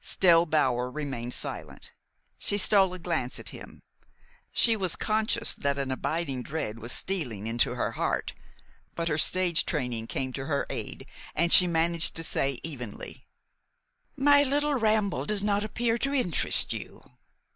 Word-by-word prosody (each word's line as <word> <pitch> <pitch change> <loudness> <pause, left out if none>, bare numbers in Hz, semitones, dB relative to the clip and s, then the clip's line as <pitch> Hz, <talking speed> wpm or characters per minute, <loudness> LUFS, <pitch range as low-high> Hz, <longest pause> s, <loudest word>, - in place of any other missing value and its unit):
Still 170 -2 +4
Bower 125 -5 +1
remained 125 -4 -4
silent. - - -5 0.5
She 205 - -1
stole 195 -2 +3
a - - -7
glance 170 -8 -3
at - - -5
him. - - -12 0.7
She 230 -2 +4
was 185 -5 -2
conscious 215 0 0
that 140 0 -2
an 135 -1 -2
abiding 140 -1 -2
dread 125 -6 -5
was 115 +2 -5
stealing 125 - -2
into 115 +2 +1
her - - -1
heart; - - -2 0.6
but 170 0 -2
her 150 0 0
stage 180 0 +2
training 125 -7 -2
came 130 +1 -3
to 135 +1 -5
her 140 -3 -1
aid, - - -6 0.3
and 170 +1 +4
she 180 - +9
managed 170 0 +2
to 165 - -1
say 135 -4 -1
evenly: 125 -9 -6 0.9
"My 285 +1 +5
little 290 +1 +1
ramble 215 -5 0
does 210 -1 +1
not 205 0 +1
appear 230 +2 -1
to 275 +3 -1
interest 185 - +1
you?" - - -8
165 Hz, 155 wpm, -27 LUFS, 135-205 Hz, 0.9 s, she